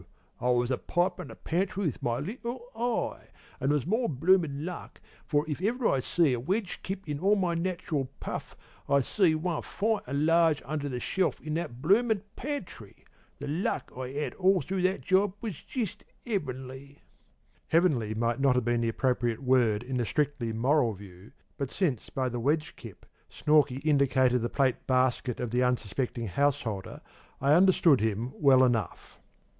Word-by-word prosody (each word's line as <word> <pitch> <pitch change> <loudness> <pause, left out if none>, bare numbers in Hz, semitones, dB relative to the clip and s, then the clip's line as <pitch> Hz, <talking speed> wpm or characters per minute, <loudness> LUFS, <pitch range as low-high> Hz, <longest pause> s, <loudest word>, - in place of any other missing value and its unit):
I 125 - 0
was 125 0 +2
a 130 - 0
pipin' 175 +1 -1
the - - -10
pantry 190 +3 -2
with 150 - -2
my 120 -1 0
little 235 - -5
eye, 240 +1 -2 0.3
and 135 - 0
there 150 - +3
was 145 - -1
more 225 +7 0
bloomin' 155 0 +2
luck; 180 -1 -7 0.3
for 150 +1 +1
if 155 +2 -4
ever 230 +5 +1
I 135 - +2
see 150 +2 +2
a 120 - -1
wedge 190 - -2
kip 195 -1 -6
in 145 -1 -3
all 200 +5 +3
my 180 -4 0
nach'ral 170 -6 -2
puff, - - -6 0.3
I 140 0 +4
see 170 - +2
one 165 0 -2
fine 220 +1 -1
an' 140 +3 0
large 165 -2 +4
under 145 -1 -3
the 125 -2 -3
shelf 185 +7 0
in 155 - -5
that 140 -6 -4
bloomin' 210 +3 +3
pantry! 290 +2 -7 0.3
The 145 - -6
luck 160 +7 -2
I 130 0 -5
'ad 150 +1 -2
all 190 -1 +3
through 190 0 -2
that 185 +1 +1
job 190 0 +2
was 210 -9 -6
jist 235 -8 -4 0.2
'eavenly.' 140 - -5 0.7
"'Heavenly 135 -11 +2
might 115 +2 0
not 135 -2 +3
have 125 -2 +1
been 120 0 +1
the 115 - +1
appropriate 120 0 0
word 120 -4 +3
in 130 +1 -3
the 120 - 0
strictly 135 -1 -1
moral 120 +1 +2
view, 95 0 -13 0.3
but 140 -2 -2
since 145 - -1
by 130 -1 -1
the 120 -1 -3
'wedge 150 +5 0
kip' - - -12 0.2
Snorkey 145 -4 +2
indicated 130 -4 +3
the 120 - -1
plate 135 -3 0
basket 130 -1 +1
of 120 -3 -3
the 125 +1 +1
unsuspecting 125 0 -1
householder, 115 -3 -1 0.4
I 140 +2 +3
understood 170 - +5
him 110 +3 -1
well 135 -3 +5
enough. 115 -7 -1
145 Hz, 175 wpm, -29 LUFS, 125-180 Hz, 0.7 s, understood